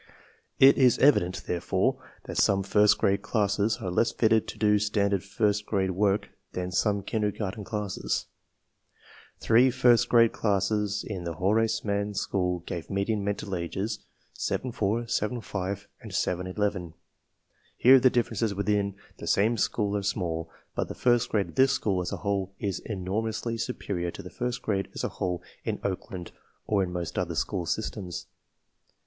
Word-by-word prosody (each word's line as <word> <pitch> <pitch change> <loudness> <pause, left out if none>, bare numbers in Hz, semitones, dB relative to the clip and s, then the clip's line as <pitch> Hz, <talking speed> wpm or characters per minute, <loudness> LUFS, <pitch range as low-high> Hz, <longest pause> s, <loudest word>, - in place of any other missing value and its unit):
It 135 +1 +7
is 125 -2 +5
evident, 95 -10 +3
therefore, 90 0 0 0.2
that - - -3
some 100 -1 +3
first 105 +2 +4
grade 100 +1 +2
classes 105 0 +1
are 90 - -3
less 115 +5 +2
fitted 110 -1 +2
to - - -7
do 105 -1 +3
standard 100 -2 +1
first 105 +1 0
grade 95 -3 +1
work 100 +2 +1 0.2
than 90 0 -3
some 100 +2 +1
kindergarten 105 -1 -2
classes. 105 -2 -2 1.1
Three 120 +3 +5
first 120 -1 +4
grade 115 -1 +6
classes 105 0 0
in 95 -5 -4
the 85 -1 -3
Horace 110 +7 +1
Mann 100 0 -1
School 90 -3 -1
gave 85 -2 -5
median 100 +1 0
mental 100 -1 -2
ages 95 +5 -3 0.3
7 130 - -2
4, 115 0 0
7 115 +1 -1
5, 100 -1 -4
and 110 -4 -9
7 90 -1 -1
11. 90 -3 -2 0.8
Here 130 +2 +7
the 130 +1 +5
differences 115 -3 0
within 100 0 0 0.2
the - - -7
same 110 +4 +3
school 105 -1 0
are 100 - 0
small, 85 -5 -2 0.2
but - - -2
the - - -7
first 120 -1 +2
grade 100 -3 0
of - - -12
this 135 +1 +4
school 95 -7 0
as 90 - -4
a - - -3
whole 100 -1 -2
is 100 -2 -3
enor 100 +1 -2
mously 115 +1 -3
superior 90 -8 -3
to - - -8
the 90 - -9
first 125 0 -3
grade 100 -3 -1
as - - -4
a - - 0
whole 90 -2 -3 0.2
in - - -2
Oakland 95 -2 -4 0.3
or 105 -2 +2
in 90 -2 -1
most 90 -2 -3
other 85 -2 -2
school 90 0 -1
systems. 95 -4 -3
100 Hz, 165 wpm, -27 LUFS, 95-110 Hz, 1.1 s, It